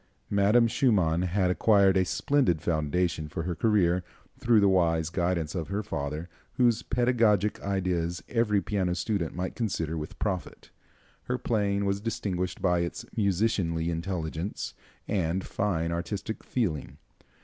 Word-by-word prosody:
Madame 105 +4 +4
Schumann 100 -9 +2
had 90 0 +1
acquired 100 0 +4
a 95 - +4
splendid 95 - +1
foundation 80 +1 0
for 80 +2 -4
her 90 +1 -2
career 90 -3 +2 0.4
through 115 -2 +4
the 100 - +4
wise 85 -4 +2
guidance 85 -3 -1
of 85 -4 -3
her 100 +2 -2
father, 75 -4 -4 0.3
whose 120 -3 +3
pedagogic 115 -4 +2
ideas 90 -3 -1
every 115 -4 +2
piano 95 -4 0
student 90 -2 -2
might 90 +2 -3
consider 85 -8 -2
with 75 -1 -6
profit. 95 -4 -4 0.5
Her 125 - -1
playing 100 -4 0
was 100 0 0
distinguished 95 -5 -3
by 90 -2 +3
its 85 0 -3
musicianly 95 -5 +1
intelligence 85 +1 -3 0.3
and 95 -1 0
fine 85 -5 -1
artistic 100 +6 -4
feeling. 75 - -2
95 Hz, 135 wpm, -28 LUFS, 85-105 Hz, 0.5 s, Madame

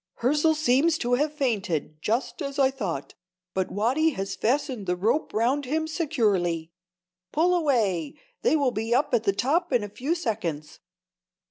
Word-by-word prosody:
"Hirzel 300 +6 +3
seems 310 +2 +3
to 245 -3 -1
have 295 +4 +2
fainted, 195 - -2
just 235 - -1
as 280 -1 -4
I 270 -1 +4
thought, 190 - -4 0.4
but 190 -1 -1
Watty 255 +10 +2
has 195 0 -3
fastened 255 -4 -1
the 180 - +1
rope 220 - 0
round 255 +6 +1
him 315 +5 -1
securely. 205 - 0 0.6
Pull 345 +4 +3
away! 225 - +1 0.3
they 450 - +3
will 280 -4 +2
be 225 +1 -1
at 280 +3 +1
the 225 -4 +2
top 290 - 0
in 245 -4 +2
a 205 - -5
few 275 +11 -2
seconds." 200 - -3
245 Hz, 155 wpm, -26 LUFS, 200-295 Hz, 0.6 s, I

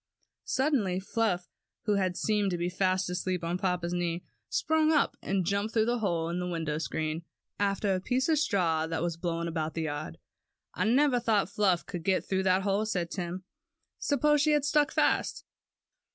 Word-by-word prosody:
Suddenly 245 -10 +1
Fluff, 190 -2 -1 0.4
who 210 - +1
had 185 -3 0
seemed 210 -2 +1
to 175 - -1
be 175 +1 -1
fast 185 +1 +1
asleep 180 0 -2
on 170 +2 -1
papa's 180 -2 -1
knee, 175 -1 -1 0.3
sprang 315 0 +2
up 300 -3 +2
and 190 -2 0
jumped 200 +4 -1
through 220 0 +3
a 245 - 0
hole 170 -6 0
in 175 +1 -2
the 180 - -2
window 160 -3 -2
screen, 155 +3 -2 0.4
after 200 0 +1
a 185 - 0
piece 255 +6 0
of 315 -3 +3
straw 170 - +1
that 165 0 -2
was 170 -1 -1
blowing 170 0 -2
about 160 -1 -3
the 165 - -1
yard. 145 -2 -4 0.6
"I - - -1
never 255 +2 +4
thought 220 -5 +1
Fluff 190 -4 +2
could 175 -3 -5
get 190 +1 +1
through 190 -1 0
that 185 0 +3
hole," 205 +2 +1
said 175 -5 -2
Tim; 180 0 -4 0.6
"suppose 295 +1 +2
she 305 +1 +3
had 295 -1 +2
stuck 295 -1 +3
fast." - - +1
185 Hz, 185 wpm, -29 LUFS, 170-220 Hz, 0.6 s, never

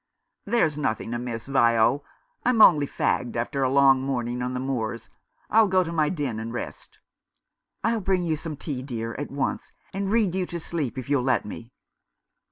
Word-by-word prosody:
"There's 170 -10 +1
nothing 115 -4 -2
amiss, 120 -2 -4
Vio. 120 0 +3 0.4
I'm 250 -2 +2
only 150 -9 +7
fagged 120 -2 -1
after 120 +4 -2
a 130 - +2
long 135 -1 +5
morning 125 -2 -2
on 125 +1 -2
the - - -2
moors. 120 -4 -3 0.4
I'll 220 0 +6
go 185 -1 +3
to 165 - -5
my 155 -3 +2
den 140 -10 -2
and 115 +1 -5
rest." 120 - -7 0.4
" - - -54
I'll 230 0 +1
bring 185 -1 +1
you 160 -2 0
some 155 -1 -6
tea, 135 -4 -4
dear, 115 -4 -4
at 145 - -4
once, 140 -1 -3 0.2
and 195 0 -2
read 215 -6 +2
you 185 -1 -1
asleep 160 -6 -4
if 130 - -5
you'll 140 -2 +2
let 130 -3 +1
me." 115 +3 -8
140 Hz, 180 wpm, -25 LUFS, 120-170 Hz, 0.4 s, only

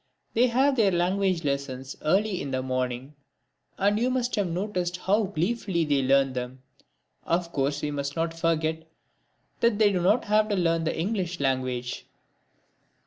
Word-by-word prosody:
They 240 +3 +4
have 265 +3 +2
their 205 -4 +4
language 185 0 +1
lessons 140 -2 -3
early 195 +4 +1
in 140 - -4
the 130 -1 -2
morning 130 +1 -3 0.6
and 205 +2 +2
you 245 +2 +2
must 250 -1 0
have 205 -4 0
noticed 180 0 -2
how 205 +4 +1
gleefully 185 -1 -1
they 145 -2 +2
learn 135 0 +3
them. 125 +1 -5 0.6
Of 170 0 -1
course 140 0 -1
we 150 - -1
must 140 0 -3
not 165 0 -1
forget 160 -1 -1 0.7
that 235 -3 +3
they 210 -1 +4
do 185 -2 0
not 205 +7 +3
have 215 +1 +2
to 205 - +1
learn 165 -3 +1
the 160 - -1
English 180 -2 -2
language! 130 -2 -2
170 Hz, 160 wpm, -26 LUFS, 140-205 Hz, 0.7 s, They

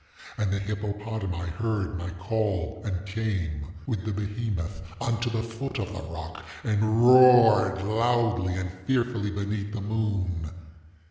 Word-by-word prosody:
And 105 -3 -1
the 100 - +1
hippopotami 100 -3 -3
heard 105 -3 -1
my 90 0 -4
call, 100 +1 -2
and 95 -3 -3
came, 95 -8 -2 0.2
with 110 -7 -2
the 110 - -2
behemoth, 105 -3 -3 0.2
unto 115 +1 0
the 115 -1 -1
foot 125 +4 -5
of 105 -1 -3
the 95 - -5
rock, 80 -1 -7 0.2
and 110 +2 +2
roared 120 -6 +7
loudly 110 -3 +1
and 90 -1 -3 0.2
fearfully 120 -5 +1
beneath 100 0 -3
the 110 - -3
moon. 100 -6 -1
105 Hz, 135 wpm, -27 LUFS, 95-110 Hz, 0.2 s, roared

